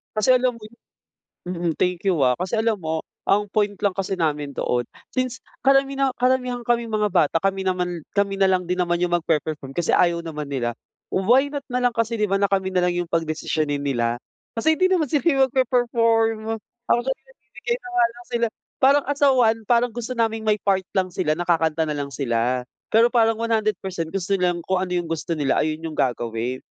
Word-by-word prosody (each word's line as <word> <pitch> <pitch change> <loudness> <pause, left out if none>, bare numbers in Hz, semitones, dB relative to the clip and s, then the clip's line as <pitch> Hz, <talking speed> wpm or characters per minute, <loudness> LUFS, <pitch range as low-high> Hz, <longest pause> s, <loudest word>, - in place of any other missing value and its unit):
Kasi 215 +4 +1
alam 250 0 +1
mo 230 - -15
yun? 215 +2 -13 0.7
Mm, 175 -2 -1
thank 180 -1 0
you 190 -4 +2
ah. 125 - +4
Kasi 185 - -2
alam 220 -3 0
mo, 160 0 -3 0.2
ang 205 +1 +3
point 205 -1 +1
lang 200 - +2
kasi 190 0 -3
namin 150 -4 -1
doon, 125 - 0 0.3
since 255 -1 -1 0.2
karamina 275 0 +3
karamihan 250 -1 0
kaming 235 -1 +1
mga 210 -3 0
bata, 165 -3 +3
kami 195 +2 0
naman 180 -2 -1 0.2
kami 200 -1 +2
na 195 - +5
lang 185 -1 +1
din 180 - -1
naman 175 -1 +1
yung 175 0 0
magpe-perform 155 -4 -1
kasi 175 - +1
ayaw 170 -1 +2
naman 150 -3 -5
nila. 120 -4 -2 0.4
Why 255 +9 +3
not 285 - -2
na 250 - -1
lang 245 -1 +1
kasi 230 0 -1
'di 210 - +2
ba 195 0 0
na 200 - +3
kami 190 -1 0
nalang 180 -1 +2 0.2
yung - - -24
pagdesisyonin 155 -3 -1
nila. 120 -3 0 0.4
Kasi 315 +8 +3
hindi 370 +4 +2
naman 360 -4 +2
sila 280 -1 +3
magpe-perform. 230 -3 +1 0.3
Ako - - +4
kasi 265 0 -1
nagbibigay - - -5
na - - -6
nga 365 - +4
lang 240 - -13
sila, 235 0 +2 0.4
parang 275 +2 +5
as 285 +1 -3
a 285 - +6
1, 230 -4 +3
parang 240 0 +3
gusto 240 +1 -5
naming 225 -1 0
may 215 -1 +2
part 190 -2 +2
lang 185 -1 0
sila 155 -1 0
na 175 - -3
kakanta 160 -2 +1
nalang 145 -2 -3
sila. 125 -1 -1 0.2
Pero 230 +3 +4
parang 225 -2 +3
100% 210 -7 -1
gusto 195 +1 -2
nilang 180 -3 0
kung 185 -1 0
ano 185 - -3
yung 175 - -2
gusto 165 0 -3
nila, 140 -3 +1
ayun 155 +1 -2
yung 160 - -4
gagawin. 120 0 -1
195 Hz, 200 wpm, -23 LUFS, 165-235 Hz, 0.7 s, a